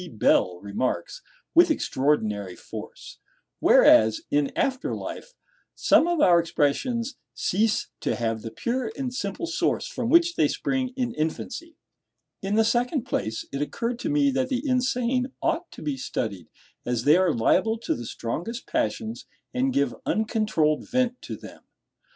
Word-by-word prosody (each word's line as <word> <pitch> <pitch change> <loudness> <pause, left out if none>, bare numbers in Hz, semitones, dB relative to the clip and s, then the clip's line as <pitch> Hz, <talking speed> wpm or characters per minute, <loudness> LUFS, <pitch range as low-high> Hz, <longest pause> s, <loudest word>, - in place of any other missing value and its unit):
Bell 90 -4 +2
remarks, 125 - -3 0.3
"with 345 +1 +6
extraordinary 110 - 0
force;" - - -10 0.4
whereas, 110 0 +6
in 145 -1 +2
after 265 -1 0
life, - - -7 0.4
some 330 - +4
of 345 -2 +1
our 175 -7 +6
expressions 230 - 0 0.2
"cease 210 +3 +1
to - - -1
have 115 -2 -2
the 115 - -6
pure 235 - -2
and 260 -3 -3
simple 200 - -3
source 340 +2 0
from 245 - -3
which 340 +3 +5
they - - +3
spring 260 -1 -1
in 245 -2 -1
infancy." 270 - -4 0.6
In 195 +2 -1
the 225 0 +4
second 245 +4 +1
place, 110 +2 -3
it 140 - -3
occurred 235 +10 -2
to - - -2
me 290 -1 +3
that 260 0 0
the 265 +2 -2
insane 255 0 0
ought 335 +1 -1
to - - -11
be 145 -3 -2
studied, 100 -9 -4 0.4
as 120 -1 -1
they 150 +4 +6
are 185 -1 +3
liable 220 - +2
to - - 0
the 120 -1 -6
strongest 175 - -4
passions, 235 -7 -2 0.3
and 260 +1 +1
give 140 - +1
uncontrolled 215 -9 +1
vent 250 -1 0
to - - -6
them. - - -12
230 Hz, 150 wpm, -25 LUFS, -, 0.6 s, with